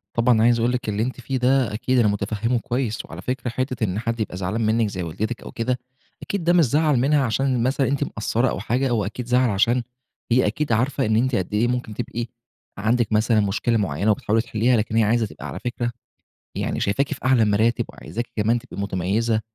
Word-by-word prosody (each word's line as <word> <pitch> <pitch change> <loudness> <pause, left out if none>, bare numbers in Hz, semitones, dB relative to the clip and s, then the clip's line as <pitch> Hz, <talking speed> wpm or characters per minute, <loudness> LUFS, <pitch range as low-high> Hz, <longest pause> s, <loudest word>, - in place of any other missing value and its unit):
طبعًا، 115 -1 +4
عايز 120 0 +4
أقول 120 +2 +2
لكِ، 125 -3 -2
اللي 105 +2 0
أنتِ 130 +1 -4
فيه 130 +2 -2
ده 125 -3 +2
أكيد 125 +3 +1
أنا 110 - +4
متفهمه 105 +4 0
كويس، 120 -1 -2
وعلى 85 +3 -9
فكرة، 125 +2 -3
حتة 130 -1 -2
إن 100 0 0
حد 115 0 -2
يبقى 100 -4 -3
زعلان 95 +5 -2
منِك، 110 0 +2
زي 90 -2 -4
والدتِك 110 +9 -3
أو - - -8
كده، 125 +2 -1 0.4
أكيد 200 -4 -3
ده 175 +1 +3
مش 170 -4 +5
زعل 150 0 +2
منها 140 +2 +3
عشان 125 +1 +1
مثلًا 135 +1 +1
أنتِ 140 +1 0
مقصرة 115 +1 0
أو - - -3
حاجة، 125 +5 0
هو 110 -5 +1
أكيد 115 +4 -5
زعل 125 0 +3
عشان 115 +5 +2 0.5
هي 125 -2 +4
أكيد 145 +5 -2
عارفة 130 +4 +1
إن 110 0 +1
أنتِ 130 +2 +2
قد 95 +2 -2
إيه 115 +3 +2
ممكن 125 -3 -2
تبقى 115 +3 -4 0.5
عندِك 110 +2 +1
مثلًا 110 +1 +3
مشكلة 105 +3 +1
معينة، 100 +2 +1
وبتحاولي 110 +2 +1
تحلّيها، 115 +1 +1
لكن 110 +1 -1
هي 115 - +4
عايزة 115 +1 +2
تبقى - - -9
على - - -6
فكرة، 120 -1 -3 0.7
يعني - - -2
شايفاكِ 135 +9 0
في - - -9
أعلى 130 -4 +4
المراتب، 110 +3 +2
وعايزاكِ 120 +1 -6
كمان 115 +3 +2
تبقي 100 - -8
متميزة، 100 +4 0
115 Hz, 210 wpm, -23 LUFS, 110-125 Hz, 0.7 s, مش